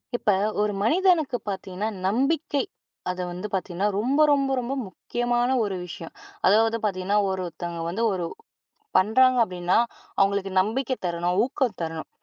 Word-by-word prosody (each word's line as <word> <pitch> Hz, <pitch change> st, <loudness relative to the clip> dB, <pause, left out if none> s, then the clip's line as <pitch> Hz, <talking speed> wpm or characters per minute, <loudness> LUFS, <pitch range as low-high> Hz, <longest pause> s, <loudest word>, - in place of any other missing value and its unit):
இப்போ 210 Hz, -4 st, +2 dB, 0.3 s
ஒரு 210 Hz, 0 st, +1 dB
மனிதனுக்குப் 310 Hz, -, +2 dB
பாத்தீங்கன்னா, 190 Hz, +1 st, -4 dB, 0.2 s
நம்பிக்கை 275 Hz, +6 st, +1 dB, 0.5 s
அத 180 Hz, 0 st, -3 dB
வந்து 180 Hz, +4 st, -5 dB
பாத்தீங்கன்னா 190 Hz, +1 st, -1 dB
ரொம்ப 265 Hz, +7 st, +2 dB
ரொம்ப 275 Hz, -1 st, +2 dB
ரொம்ப 250 Hz, +2 st, -3 dB
முக்கியமான 240 Hz, +5 st, -1 dB
ஒரு 200 Hz, -2 st, -2 dB
விஷயம். 170 Hz, -, -9 dB, 0.3 s
அதாவது, 225 Hz, +2 st, +4 dB
பாத்தீங்கன்னா 200 Hz, +1 st, +1 dB
ஒரொருத்தவங்க 175 Hz, -2 st, -4 dB
வந்து 205 Hz, +7 st, -2 dB
ஒரு 180 Hz, -2 st, -2 dB, 0.7 s
பண்றாங்க 255 Hz, +6 st, +4 dB
அப்படின்னா, 180 Hz, -2 st, 0 dB, 0.4 s
அவங்களுக்கு 195 Hz, 0 st, +2 dB
நம்பிக்கை 255 Hz, +6 st, -1 dB
தரணும், 175 Hz, +1 st, -1 dB
ஊக்கம் 250 Hz, -4 st, -1 dB
தரணும். 160 Hz, -1 st, -4 dB
205 Hz, 130 wpm, -25 LUFS, 185-250 Hz, 0.7 s, அதாவது